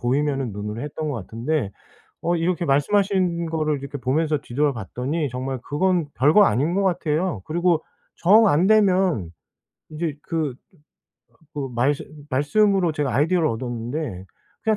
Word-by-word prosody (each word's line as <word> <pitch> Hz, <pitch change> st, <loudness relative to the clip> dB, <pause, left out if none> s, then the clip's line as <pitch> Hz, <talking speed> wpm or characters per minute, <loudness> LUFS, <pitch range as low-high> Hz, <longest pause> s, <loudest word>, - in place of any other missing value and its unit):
보이면은 135 Hz, -1 st, 0 dB
눈으로 105 Hz, +3 st, -5 dB
했던 150 Hz, +1 st, -4 dB
것 -, -, -3 dB
같은데 115 Hz, +3 st, -2 dB, 0.5 s
어 175 Hz, +1 st, +1 dB
이렇게 170 Hz, +1 st, 0 dB
말씀하신 175 Hz, +3 st, +1 dB
거를 155 Hz, -2 st, 0 dB
이렇게 140 Hz, +1 st, -6 dB
보면서 150 Hz, +4 st, 0 dB
뒤돌아봤더니 135 Hz, -, -2 dB
정말 130 Hz, +1 st, -4 dB
그건 175 Hz, 0 st, 0 dB
별거 150 Hz, +11 st, +5 dB
아닌 145 Hz, -, +1 dB
것 200 Hz, -, +1 dB
같아요. 170 Hz, -, 0 dB
그리고 170 Hz, 0 st, +1 dB, 0.3 s
정 215 Hz, +6 st, +6 dB
안되면 185 Hz, -, +3 dB, 0.6 s
인제 155 Hz, -1 st, -3 dB
그 155 Hz, -7 st, -2 dB, 1.0 s
그 140 Hz, -2 st, -3 dB
말씀 135 Hz, +4 st, +1 dB, 0.3 s
말씀으로 175 Hz, +6 st, +2 dB
제가 145 Hz, -5 st, -1 dB
아이디어를 165 Hz, +5 st, +2 dB
얻었는데 120 Hz, -, -4 dB, 0.4 s
'그냥 220 Hz, -1 st, +2 dB
150 Hz, 315 characters per minute, -23 LUFS, 130-175 Hz, 1.0 s, 정